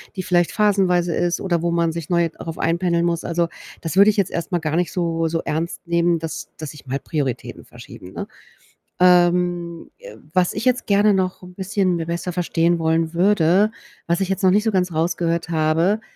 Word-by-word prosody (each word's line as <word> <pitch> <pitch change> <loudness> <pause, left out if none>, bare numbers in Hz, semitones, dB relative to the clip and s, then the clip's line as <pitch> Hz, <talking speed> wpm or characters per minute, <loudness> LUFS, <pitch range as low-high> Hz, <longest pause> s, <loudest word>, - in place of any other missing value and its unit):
die 185 - -3
vielleicht 175 -2 +1
phasenweise 185 -5 +2
ist 175 0 0
oder 170 -3 -1
wo 170 - +1
man 170 -1 +1
sich 170 +1 -6
neu 170 -1 +2
darauf 165 0 -8
einpendeln 170 0 +1
muss. 170 -1 -1
Also, 170 0 0 0.3
das 165 +3 -4
würde 205 +2 +7
ich 210 - -8
jetzt 195 -2 +1
erst 170 +3 -4
mal 175 - +1
gar 155 -1 -2
nicht 175 -2 0
so 165 -2 -1
so 165 0 -1
ernst 165 +3 -3
nehmen, 170 0 +2
dass 160 -1 -6
dass 155 -3 -6
sich 150 -2 -12
mal 135 +2 -3
Prioritäten 140 -7 -4
verschieben, 90 +1 -12
ne? - - -5 0.7
Ähm, 175 -1 +2
äh, - - -12 0.2
was 180 -1 +2
ich 210 - -4
jetzt 250 -1 +1
gerne 205 0 +3
noch 185 -1 -1
'n 180 0 -13
bisschen 190 -2 0
mir 165 -1 -3
besser 170 +1 -3
verstehen 170 -1 +1
wollen 165 0 0
würde, 195 +2 +3 0.3
was 170 +2 0
ich 190 - -1
jetzt 195 0 -2
noch 185 - +5
nicht 210 +2 +3
so 220 - +1
ganz 180 -3 0
rausgehört 170 +1 -1
habe, 165 +6 +1
175 Hz, 205 wpm, -21 LUFS, 165-185 Hz, 0.7 s, würde